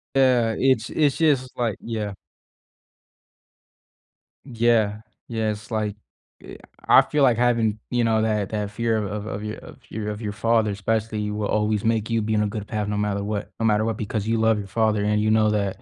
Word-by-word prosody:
Yeah, 125 -4 +3
it's 130 -4 +2
it's 145 -3 +1
just, 140 -6 +1
like 115 -4 -1
yeah. 110 -3 -4 2.3
Yeah, 115 -4 +1 0.3
yeah, 110 -2 -1
it's 105 +2 -9
like 105 -1 -1 0.5
eh, - - -10 0.3
I - - +8
feel 150 -2 0
like 125 -4 +4
having, 115 -3 +1
you 120 -1 +1
know, 110 -1 +2
that 105 -3 0
that 105 -2 -3
fear 115 +1 0
of 105 - -1
of 105 +1 -5
of 105 -1 -5 0.5
your 110 -1 -5
of 105 +1 -5
your 105 -2 -3
father, 115 0 +1
especially, 105 +1 -2
will 105 0 -2
always 105 -1 0
make 115 0 0
you 115 -1 +1
be 110 +1 -1
in 105 0 +2
a - - 0
good 105 0 -5
path 105 -2 -2
no 105 0 -2
matter 105 -1 -1
what, 105 0 -4
no 115 - 0
matter 105 -1 +3
what 115 -1 -2
because 110 0 -3
you 115 0 +1
love 110 -1 +3
your 100 -1 -5
father, 110 0 +1
and 105 0 +1
you 110 0 +2
know 110 -1 +4
that 100 -2 -1
110 Hz, 195 wpm, -23 LUFS, 105-115 Hz, 2.3 s, I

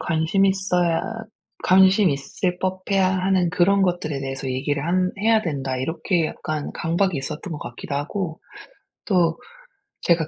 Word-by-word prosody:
관심 165 +3 +1
있어야 180 -3 +1 0.6
관심 190 +1 +5
있을 145 +6 -2
법해야 190 +1 0
하는 185 -1 +2
그런 195 +3 +3
것들에 175 -6 -1
대해서 135 0 -4
얘기를 140 +2 -1
한 185 +2 +1
해야 220 +1 +3
된다.' 135 -8 -3
이렇게 160 +5 0
약간 155 -1 -4
강박이 170 +2 0
있었던 150 +6 -5
것 150 - -5
같기도 120 +3 -7
하고 160 +4 -3 0.6
또 170 -5 +2 0.7
제가 165 -2 +2
175 Hz, 290 characters per minute, -23 LUFS, 150-190 Hz, 0.7 s, 관심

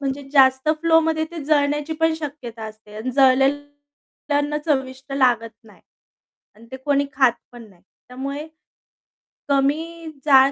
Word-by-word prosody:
म्हणजे 275 0 -3
जास्त 265 0 +4
फ्लोमध्ये 325 -1 +2
ते 330 -3 -7
जळण्याची 295 +1 +1
पण 325 0 +3
शक्यता 270 -8 -7
असते 215 -1 -12
अन 225 +4 -4
जळलेल 270 +2 +4 0.8
अन्न 290 +1 0
चविष्ट 265 -2 -2
लागत 245 -4 +2
नाही 210 - -19 0.7
अन 220 +2 -17
ते 260 - -6
कोणी 280 +1 0
खात 265 -3 +4 0.2
पण 240 -1 -11
नाही. 180 -4 -23 0.3
त्यामुळे, 275 +4 -6 1.0
कमी 315 +5 0 0.2
जाळ 270 -1 +6
275 Hz, 130 wpm, -21 LUFS, 260-295 Hz, 1.0 s, जाळ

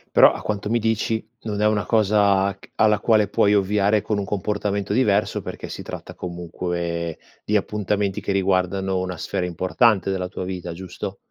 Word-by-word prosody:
Però - - +8
a - - -6
quanto 105 0 -3
mi 120 +1 +2
dici 110 0 0 0.2
non 105 -2 -3
è 105 - +4
una 105 -1 +1
cosa 100 -3 +3
c - - -18
alla 105 -1 +4
quale 110 -3 +3
puoi 100 0 +3
ovviare 105 +1 +2
con 105 0 -1
un 100 - -2
comportamento 100 0 -2
diverso, 105 -4 +2
perché - - -7
si - - -6
tratta - - -8
comunque 85 -1 -4 0.3
di 105 - 0
appuntamenti 105 -1 -1
che - - -2
riguardano 95 0 +1
una 90 -2 -3
sfera 90 - -2
importante 95 +3 +2
della 95 -1 -1
tua 90 - -6
vita, 90 -2 -5
giusto? 95 +1 -7
100 Hz, 175 wpm, -23 LUFS, 95-105 Hz, 0.3 s, Però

